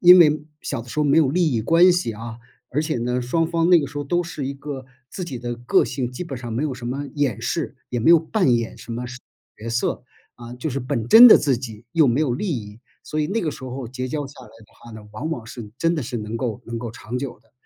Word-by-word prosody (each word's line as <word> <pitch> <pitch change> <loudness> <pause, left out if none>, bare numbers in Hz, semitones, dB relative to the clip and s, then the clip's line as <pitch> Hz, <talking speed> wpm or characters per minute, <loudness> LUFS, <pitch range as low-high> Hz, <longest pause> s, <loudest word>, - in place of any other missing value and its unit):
因 180 +1 +9
为 155 -3 +5 0.2
小 125 -5 -4
的 120 - -15
时 150 - -6
候 150 - +3
没 145 +1 +3
有 155 -4 +4
利 165 +1 +2
益 115 - +1
关 170 +8 +6
系 175 -10 -1
啊， 115 +2 -8 0.3
而 150 +4 0
且 155 -4 -2
呢， 125 +1 -1
双 165 +6 +1
方 170 0 +1
那 175 - +8
个 145 - -2
时 145 - -11
候 145 - -1
都 175 +5 0
是 160 -4 -5
一 140 - -3
个 140 -1 -7 0.2
自 185 - -5
己 135 -8 -6
的 120 0 -4
个 120 +1 +2
性， 125 -1 -3
基 125 +8 -6
本 140 -6 -6
上 120 -2 -6
没 125 +7 -1
有 145 -4 -2
什 125 -1 -10
么 140 +3 -3
掩 145 -7 0
饰， - - -3
也 120 - -1
没 140 - +4
有 170 - +8
扮 160 - +2
演 115 -1 -4
什 - - -11
么 120 +2 -4 0.5
角 110 - -8
色， 115 +1 -1 0.3
啊， 120 0 -10
就 125 +6 -4
是 140 -1 -3
本 120 -3 -2
真 235 - +10
的 - - +9
自 140 -4 +1
己 115 -3 -8
又 160 -4 +4
没 120 +5 +2
有 140 -6 +1
利 200 +11 -3
益。 105 0 -11 0.2
所 155 - -2
以 150 - -1
那 220 +5 0
个 155 -3 -2
时 140 - -11
候 130 0 -5
结 130 +2 -5
交 145 +1 -3
下 140 - -13
来 125 - -13
的 115 -1 -18
话 120 - -13
呢， 110 -2 -11
往 145 +9 -4
往 125 -9 -5
是 115 -2 -9
真 165 +1 +2
的 150 - -2
是 120 0 -4
能 110 0 -4
够 115 -1 -3
能 115 - -5
够 115 0 -5
长 115 +2 -7
久 135 -1 -5
的。 - - -34
130 Hz, 300 characters per minute, -22 LUFS, 120-155 Hz, 0.5 s, 真